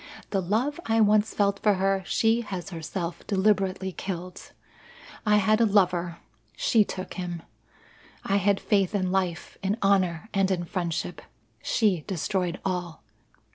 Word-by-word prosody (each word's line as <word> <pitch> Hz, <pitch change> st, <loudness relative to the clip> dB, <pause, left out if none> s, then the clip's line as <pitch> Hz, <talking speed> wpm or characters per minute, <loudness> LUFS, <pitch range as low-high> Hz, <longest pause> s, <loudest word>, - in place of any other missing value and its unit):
The 195 Hz, -, +1 dB
love 230 Hz, -, 0 dB
I 225 Hz, 0 st, +2 dB
once 215 Hz, 0 st, +4 dB
felt 200 Hz, -1 st, +2 dB
for 210 Hz, -2 st, +4 dB
her 195 Hz, +1 st, +1 dB
she 225 Hz, +1 st, +2 dB
has 195 Hz, -4 st, -6 dB
herself 170 Hz, +1 st, -4 dB
deliberately 190 Hz, -2 st, +1 dB
killed. 180 Hz, -1 st, -6 dB, 0.8 s
I 210 Hz, -, +5 dB
had 215 Hz, +2 st, +3 dB
a -, -, +6 dB
lover 180 Hz, -4 st, +2 dB, 0.4 s
she 240 Hz, -, +3 dB
took 185 Hz, -2 st, -6 dB
him. 175 Hz, -3 st, -5 dB, 0.8 s
I 200 Hz, -, +1 dB
had 200 Hz, 0 st, +2 dB
faith 200 Hz, -1 st, +1 dB
in 185 Hz, -2 st, 0 dB
life, 185 Hz, -3 st, -2 dB
in 200 Hz, +2 st, 0 dB
honour, 185 Hz, -3 st, +2 dB
and 195 Hz, -1 st, +2 dB
in 180 Hz, -2 st, 0 dB
friendship. 175 Hz, -2 st, -3 dB, 0.4 s
She 195 Hz, -8 st, +1 dB
destroyed 180 Hz, 0 st, -1 dB
all. 180 Hz, -6 st, -3 dB
195 Hz, 140 wpm, -26 LUFS, 180-205 Hz, 0.8 s, a